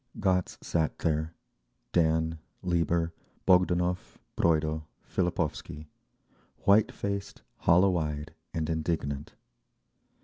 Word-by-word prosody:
Gotz 90 -2 +1
sat 80 -2 0
there, 80 0 -1 0.6
Dan, 80 -1 +2 0.2
Lieber, 85 -1 +1 0.3
Bogdanov, 90 -1 +2 0.2
Broido, 80 -1 +2 0.2
Fillipovsky,—white 90 +4 -1
faced, 100 0 -4
hollow 90 +2 +4
eyed 75 -1 -3 0.2
and 80 -1 -2
indignant. 75 -3 -2
80 Hz, 75 wpm, -29 LUFS, 80-90 Hz, 0.6 s, hollow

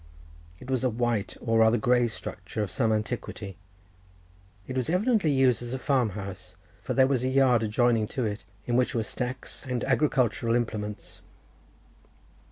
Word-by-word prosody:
It 125 - -12
was 130 -1 0
a 130 - +3
white, 120 -3 -1
or 115 -1 +2
rather 110 +1 +5
grey 120 +2 +3
structure 110 -1 -5
of 100 - -5
some 115 -4 +1
antiquity. 110 -3 -3 1.1
It 130 - -6
was 130 +2 -1
evidently 200 0 +2
used 130 -4 +3
as 120 +1 -4
a - - -2
farm 130 -4 +1
house, 95 -2 -8 0.3
for - - -3
there 130 - +6
was 130 -2 +1
a 130 - +1
yard 130 -3 +4
adjoining 115 0 +2
to 125 - +1
it, 105 0 -3 0.2
in 120 - 0
which 125 0 +2
were 115 - +1
stacks 125 +4 -5
and 125 -2 -2
agricultural 125 -4 +1
implements. 105 -3 -4
120 Hz, 165 wpm, -27 LUFS, 110-130 Hz, 1.1 s, there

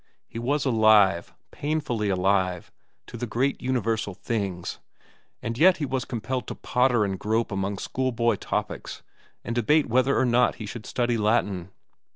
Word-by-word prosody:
He 115 - -7
was 140 +4 0
alive, 110 -7 +4 0.2
painfully 140 -8 -2
alive, 95 -1 0 0.3
to - - -9
the 120 - -4
great 130 +5 0
universal 115 -6 -1
things, 100 -6 -3 0.6
and 115 +2 -3
yet 180 +2 +6
he 150 - -2
was 130 -1 -2
compelled 125 +2 -3
to - - -5
potter 125 -3 +2
and 95 -2 -3
grope 110 +2 0
among 95 0 -2
schoolboy 120 -2 0
topics - - -4 0.4
and 115 - -3
debate 145 +6 +3
whether 130 +3 +2
or - - +3
not 125 0 +3
he 110 - -7
should 110 +2 -8
study 120 -2 0
Latin. 105 -4 0
115 Hz, 155 wpm, -25 LUFS, 105-130 Hz, 0.6 s, yet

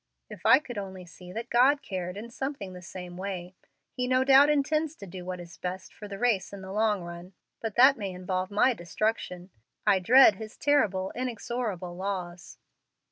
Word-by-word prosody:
If - - -4
I - - +9
could 245 -7 -6
only 190 -2 -7
see 180 +1 -13
that 230 +5 -6
God 270 +4 +4
cared 180 -1 -4
in 230 +3 -8
something 250 -8 -5
the 180 - -9
same 180 0 -9
way! 185 -2 -5 0.4
He 250 0 -2
no 255 0 +3
doubt 275 +2 +7
intends 305 +1 +1
to 200 - -10
do 185 -1 -8
what 180 0 -5
is 170 -1 -11
best 185 0 -5
for 210 - -9
the 200 -1 -7
race 215 -5 +1
in 200 -1 -9
the 190 - -8
long 210 -2 +1
run, 175 +2 -9 0.3
but 225 -3 -4
that 265 +3 +7
may 200 -2 -3
involve 185 0 -3
my 210 +5 +3
destruction. 180 -1 -3 0.3
I 200 -3 +4
dread 225 +1 +7
His 220 +1 -9
terrible, 200 -10 +2
inexorable 230 -7 -3
laws." 180 -2 -5
200 Hz, 190 wpm, -28 LUFS, 180-245 Hz, 0.4 s, I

